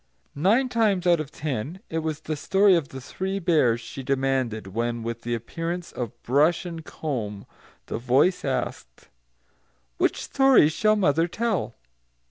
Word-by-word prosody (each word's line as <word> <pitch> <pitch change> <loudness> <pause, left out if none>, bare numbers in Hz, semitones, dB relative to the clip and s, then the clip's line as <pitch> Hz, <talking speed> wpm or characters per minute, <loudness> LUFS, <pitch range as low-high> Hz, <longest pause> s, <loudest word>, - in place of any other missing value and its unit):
Nine 210 - +3
times 215 -7 +1
out 175 -2 +4
of 155 -3 -4
ten, 150 - -4
it 165 - -2
was 155 -1 -3
the 155 - -3
story 195 +6 +4
of 165 -5 +1
The 130 - -8
Three 190 +9 -4
Bears 155 -11 +2
she 135 - -8
demanded 130 -4 -1
when, 115 +1 -2
with 115 0 -4
the 120 0 -2
appearance 165 +9 -5
of 120 -1 -6
brush 150 +8 +2
and 165 -2 -6
comb, 110 -12 -5 0.4
the - - -4
voice 130 +10 +2
asked, - - -4 0.9
"Which - - +1
story 270 - +5
shall 215 +6 +2
mother 165 -4 +2
tell?" 215 - -2
155 Hz, 150 wpm, -25 LUFS, 120-180 Hz, 0.9 s, story